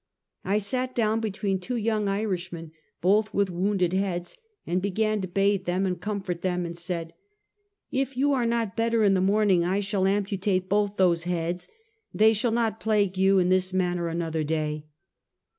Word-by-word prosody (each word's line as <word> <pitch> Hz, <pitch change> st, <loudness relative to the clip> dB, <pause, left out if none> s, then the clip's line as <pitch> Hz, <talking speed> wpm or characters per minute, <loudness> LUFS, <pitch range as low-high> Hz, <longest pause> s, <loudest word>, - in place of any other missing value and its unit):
I 200 Hz, +2 st, +1 dB
sat 255 Hz, +5 st, -2 dB
down 220 Hz, -1 st, +1 dB
between 200 Hz, -3 st, -2 dB
two 245 Hz, +7 st, -4 dB
young 220 Hz, -2 st, 0 dB
Irishmen, 185 Hz, -5 st, -3 dB, 0.3 s
both 210 Hz, +4 st, +3 dB
with 200 Hz, -2 st, +1 dB
wounded 185 Hz, 0 st, 0 dB
heads, 185 Hz, -2 st, -2 dB, 0.3 s
and 180 Hz, +2 st, 0 dB
began 215 Hz, +2 st, 0 dB
to 185 Hz, -, -3 dB
bathe 195 Hz, +1 st, +1 dB
them, 185 Hz, +2 st, 0 dB
and 180 Hz, -1 st, -2 dB
comfort 195 Hz, -5 st, -3 dB
them, 180 Hz, -1 st, -1 dB
and 170 Hz, 0 st, -6 dB
said: 170 Hz, -1 st, -4 dB, 0.4 s
" 410 Hz, 0 st, -51 dB
If 270 Hz, -1 st, -4 dB
you 285 Hz, +2 st, +3 dB
are 245 Hz, -3 st, +1 dB
not 230 Hz, -3 st, -1 dB
better 230 Hz, -1 st, +1 dB
in 200 Hz, -2 st, +4 dB
the 185 Hz, -, +2 dB
morning, 195 Hz, -2 st, +3 dB
I 185 Hz, +3 st, +1 dB
shall 200 Hz, -1 st, 0 dB
am 200 Hz, +1 st, +1 dB
putate 190 Hz, -2 st, -1 dB
both 205 Hz, +1 st, 0 dB
those 175 Hz, -3 st, +2 dB
heads; 175 Hz, 0 st, -2 dB, 0.4 s
they 220 Hz, +1 st, +4 dB
shall 225 Hz, +3 st, 0 dB
not 225 Hz, -2 st, 0 dB
plague 205 Hz, -3 st, +1 dB
you 190 Hz, +1 st, +4 dB
in 180 Hz, -1 st, +3 dB
this 185 Hz, 0 st, +1 dB
manner 180 Hz, -2 st, 0 dB
another 165 Hz, -1 st, -2 dB
day." 155 Hz, -1 st, -2 dB
195 Hz, 180 wpm, -26 LUFS, 180-215 Hz, 0.4 s, in